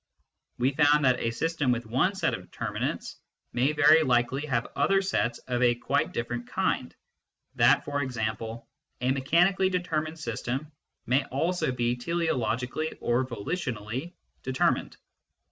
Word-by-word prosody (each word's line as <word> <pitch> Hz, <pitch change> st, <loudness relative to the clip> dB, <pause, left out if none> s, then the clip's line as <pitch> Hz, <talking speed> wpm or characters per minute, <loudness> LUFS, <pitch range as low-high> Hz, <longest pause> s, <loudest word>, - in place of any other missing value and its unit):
We 125 Hz, +3 st, +2 dB
found 150 Hz, 0 st, +4 dB
that 125 Hz, -1 st, +4 dB
a 115 Hz, -, 0 dB
system 145 Hz, +2 st, 0 dB
with 120 Hz, -1 st, -1 dB
one 130 Hz, -, +1 dB
set 190 Hz, -, 0 dB
of -, -, -4 dB
determinants -, -, -4 dB, 0.4 s
may 130 Hz, +5 st, +2 dB
very 155 Hz, +1 st, +6 dB
likely 130 Hz, +1 st, +1 dB
have 120 Hz, -4 st, -1 dB
other 195 Hz, +8 st, +3 dB
sets 190 Hz, -11 st, 0 dB
of 125 Hz, -1 st, -1 dB
a 120 Hz, -1 st, +4 dB
quite 120 Hz, -, 0 dB
different 120 Hz, +1 st, -4 dB
kind, -, -, -1 dB, 0.6 s
that, -, -, +4 dB
for 145 Hz, 0 st, -1 dB
example, 115 Hz, -2 st, -3 dB, 0.3 s
a 125 Hz, +1 st, +1 dB
mechanically 175 Hz, +8 st, +3 dB
determined 165 Hz, -3 st, -2 dB
system 130 Hz, +2 st, -4 dB, 0.3 s
may 130 Hz, +3 st, +2 dB
also 165 Hz, +3 st, 0 dB
be 120 Hz, -1 st, 0 dB
teleologically 130 Hz, -1 st, -1 dB
or 120 Hz, +2 st, +1 dB
volitionally 125 Hz, -, -4 dB, 0.3 s
determined. 130 Hz, 0 st, 0 dB
130 Hz, 135 wpm, -28 LUFS, 120-155 Hz, 0.6 s, very